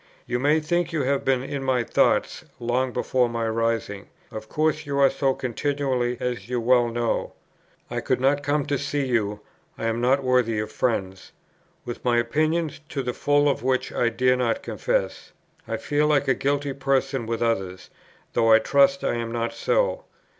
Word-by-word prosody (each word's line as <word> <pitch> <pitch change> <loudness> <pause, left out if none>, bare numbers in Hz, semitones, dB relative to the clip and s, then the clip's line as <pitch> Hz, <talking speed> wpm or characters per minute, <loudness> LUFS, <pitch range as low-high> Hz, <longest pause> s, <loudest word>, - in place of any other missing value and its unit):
You 120 0 -2
may 145 +4 +3
think 175 +2 -1
you 155 -4 -1
have 140 +1 0
been 130 -1 +1
in 135 0 -4
my 130 -2 +1
thoughts, - - +1 0.2
long 125 +2 0
before 125 0 +1
my 115 -1 -2
rising. 115 -3 -2 0.2
Of 110 0 -8
course 155 0 0
you 140 -1 -2
are 140 -1 +5
so 135 -1 0
continually, 130 -1 -1
as 125 -1 -4
you 125 -1 -1
well 120 +1 +3
know. 120 0 -2 0.5
I - - -3
could - - 0
not 140 +2 +2
come 145 0 0
to 140 -2 -1
see 140 0 -1
you; 105 -5 -1 0.4
I - - -4
am 115 +1 -1
not 135 +3 +2
worthy 125 -3 +2
of 105 0 -3
friends. 95 -6 -2 0.5
With 120 - -6
my 120 -1 +2
opinions, 155 +7 0
to 135 - -3
the 125 0 -2
full 145 +2 +2
of 140 - 0
which 130 +1 0
I 120 - +2
dare 125 +2 +2
not 120 -2 -1
confess, - - -2 0.3
I - - -2
feel 150 +1 0
like 145 -2 +2
a 135 - +4
guilty 140 +1 -1
person 135 -2 0
with 115 0 -1
others, 95 -5 -2 0.4
though 115 0 +3
I 110 - +9
trust 140 +4 +3
I - - 0
am 115 -1 -4
not 115 0 -2
so. - - 0
130 Hz, 185 wpm, -24 LUFS, 115-140 Hz, 0.5 s, I